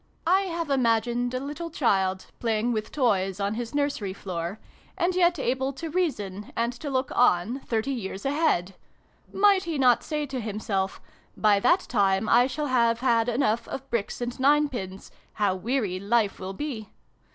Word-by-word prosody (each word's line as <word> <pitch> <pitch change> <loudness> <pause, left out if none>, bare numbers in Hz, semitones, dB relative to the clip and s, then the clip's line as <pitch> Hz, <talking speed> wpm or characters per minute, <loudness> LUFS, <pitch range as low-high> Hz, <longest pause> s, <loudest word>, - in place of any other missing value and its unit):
I 370 +4 +4
have 335 -3 -3
imagined 240 -1 +1
a - - 0
little 295 +5 -5
child, 190 - +1
playing 230 0 0
with 215 -2 -3
toys 195 -8 +1
on 200 +1 0
his 235 +3 -5
nursery 285 -10 -1
floor, 180 +1 -5 0.4
and 355 +2 +1
yet 350 -1 +3
able 265 0 0
to 320 +4 -6
reason, 210 - -2
and 235 +1 0
to 285 +4 -6
look 260 0 -1
on, 235 +1 +3
thirty 230 0 -2
years 200 -5 -5
ahead. 275 - +1 0.6
Might 395 -1 +4
he 330 -3 -2
not 250 -3 +4
say 300 -1 -2
to 265 -2 -4
himself 205 -3 -2 0.2
' - - -34
By 210 -2 +4
that 350 - +4
time 200 - +1
I 245 +3 +5
shall 300 +3 -3
have 235 -3 +2
had 235 -2 +2
enough 235 -2 0
of 270 0 -6
bricks 235 0 -2
and 240 +1 -4
ninepins. 260 -9 +1 0.2
How 205 -3 +1
weary 200 -1 -1
Life 205 +1 +1
will 190 +1 -5
be 225 -3 -5
240 Hz, 170 wpm, -26 LUFS, 205-280 Hz, 0.6 s, I